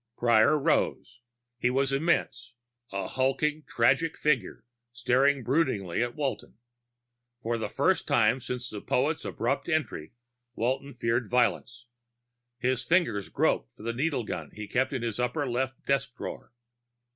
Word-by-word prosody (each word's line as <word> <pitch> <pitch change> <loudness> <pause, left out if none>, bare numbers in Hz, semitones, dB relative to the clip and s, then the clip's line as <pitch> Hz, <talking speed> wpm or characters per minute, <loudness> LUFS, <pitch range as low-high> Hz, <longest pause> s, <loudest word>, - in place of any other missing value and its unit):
Prior 120 +4 +4
rose. 125 -3 0 0.4
He 125 - +2
was 135 +1 +1
immense, 135 -5 0 0.4
a 100 0 -3
hulking 135 +4 0
tragic 155 +7 +2
figure 150 -7 0 0.3
staring 130 +3 +2
broodingly 120 - 0
at 120 0 -1
Walton. 145 -3 -3 0.9
For 115 +1 -1
the - - -3
first - - +1
time 130 - +3
since 125 0 -5
the 105 - -6
poet's 150 +5 0
abrupt - - -2
entry, 155 - -2 0.4
Walton 130 +3 -2
feared 115 -2 0
violence. 120 0 0 0.7
His 125 0 0
fingers 145 - +1
groped - - 0
for - - -13
the 115 +1 -2
needle 135 0 0
gun 105 - -5
he 105 0 -6
kept 130 +5 0
in 130 -4 -3
his 115 -1 -3
upper 125 +4 0
left 130 +2 -2
desk 135 -2 0
drawer. - - -7
125 Hz, 140 wpm, -28 LUFS, 115-140 Hz, 0.9 s, Prior